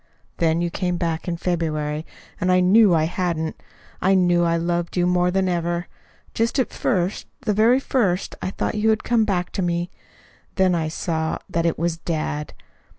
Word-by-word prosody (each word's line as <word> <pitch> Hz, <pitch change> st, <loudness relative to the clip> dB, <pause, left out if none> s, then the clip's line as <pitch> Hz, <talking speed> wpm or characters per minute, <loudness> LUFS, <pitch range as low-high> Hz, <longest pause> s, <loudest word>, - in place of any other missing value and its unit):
"Then 165 Hz, 0 st, +2 dB
you 175 Hz, -1 st, -1 dB
came 180 Hz, 0 st, -1 dB
back 165 Hz, -1 st, -2 dB
in 170 Hz, -1 st, -2 dB
February, 155 Hz, -3 st, -2 dB, 0.3 s
and 185 Hz, +1 st, +1 dB
I 180 Hz, -, +5 dB
knew 190 Hz, +1 st, +5 dB
I 155 Hz, -, +3 dB
hadn't. 165 Hz, -1 st, -2 dB, 0.4 s
I 195 Hz, +1 st, +4 dB
knew 175 Hz, -2 st, +3 dB
I 170 Hz, 0 st, +2 dB
loved 170 Hz, +1 st, -2 dB
you 175 Hz, -, +3 dB
more 180 Hz, 0 st, +2 dB
than 190 Hz, +1 st, +1 dB
ever. 175 Hz, 0 st, -1 dB, 0.5 s
Just 230 Hz, +4 st, 0 dB
at 260 Hz, -, +1 dB
first, 185 Hz, -4 st, -1 dB
the 220 Hz, -4 st, 0 dB
very 225 Hz, +5 st, +4 dB
first, 200 Hz, -9 st, 0 dB
I -, -, -2 dB
thought -, -, -2 dB
you 215 Hz, +1 st, +1 dB
had 215 Hz, -1 st, +1 dB
come 230 Hz, -2 st, +2 dB
back 180 Hz, -4 st, -1 dB
to -, -, -2 dB
me. 175 Hz, 0 st, -1 dB, 0.6 s
Then 190 Hz, -2 st, +3 dB
I 165 Hz, -2 st, 0 dB
saw 160 Hz, 0 st, -2 dB
that 170 Hz, 0 st, +1 dB
it 165 Hz, -, 0 dB
was 170 Hz, 0 st, -1 dB
dad. 155 Hz, -2 st, -3 dB
175 Hz, 185 wpm, -22 LUFS, 165-190 Hz, 0.6 s, I